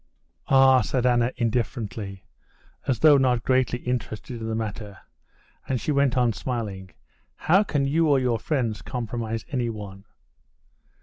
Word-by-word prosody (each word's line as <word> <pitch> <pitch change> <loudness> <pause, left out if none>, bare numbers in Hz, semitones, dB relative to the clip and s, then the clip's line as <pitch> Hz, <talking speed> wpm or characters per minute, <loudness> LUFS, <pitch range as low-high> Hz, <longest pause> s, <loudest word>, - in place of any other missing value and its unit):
"Ah!" 135 -1 +6
said 125 -1 -1
Anna 120 0 +3
indifferently, 115 -4 -3 0.6
as 130 -5 0
though 150 -3 +7
not 125 -3 +2
greatly 130 -2 +1
interested 120 -1 -4
in 110 - -4
the 110 - -2
matter, 105 -2 -5 0.7
and 130 -2 -1
she 150 - -2
went 140 -2 +2
on 120 -2 +3
smiling: 105 -6 -5 0.5
"How 185 +5 +3
can 145 -9 0
you 160 +4 +2
or 145 -2 +4
your 125 -3 0
friends 115 - -2
compromise 115 -1 -4
anyone?" 105 -6 -4
120 Hz, 135 wpm, -25 LUFS, 110-130 Hz, 0.7 s, though